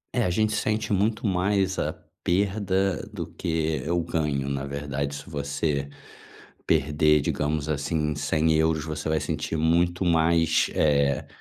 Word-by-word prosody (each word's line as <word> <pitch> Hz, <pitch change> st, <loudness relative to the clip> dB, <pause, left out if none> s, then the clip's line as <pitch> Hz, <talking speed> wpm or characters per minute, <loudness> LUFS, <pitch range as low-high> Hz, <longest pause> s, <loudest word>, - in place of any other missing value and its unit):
É, 125 Hz, -, +2 dB
a -, -, +1 dB
gente 110 Hz, +4 st, +1 dB
sente 110 Hz, 0 st, 0 dB
muito 105 Hz, +3 st, 0 dB
mais 95 Hz, 0 st, +1 dB
a -, -, 0 dB, 0.3 s
perda 95 Hz, -1 st, +1 dB
do -, -, -5 dB
que 80 Hz, -1 st, -2 dB
o 85 Hz, 0 st, +2 dB
ganho, 75 Hz, -4 st, -1 dB
na 70 Hz, -1 st, -2 dB
verdade, 70 Hz, 0 st, -3 dB
se 70 Hz, -, -9 dB
você 70 Hz, -2 st, -2 dB, 0.8 s
perder, 75 Hz, 0 st, +3 dB
digamos 75 Hz, +1 st, -1 dB
assim, 75 Hz, +1 st, -1 dB
100€, 80 Hz, +1 st, +1 dB
você 75 Hz, 0 st, -5 dB
vai 80 Hz, -1 st, +1 dB
sentir 80 Hz, -, -3 dB
muito 85 Hz, +3 st, +2 dB
mais, 80 Hz, -1 st, +3 dB
eh, 70 Hz, -2 st, +2 dB
80 Hz, 135 wpm, -25 LUFS, 75-90 Hz, 0.8 s, perder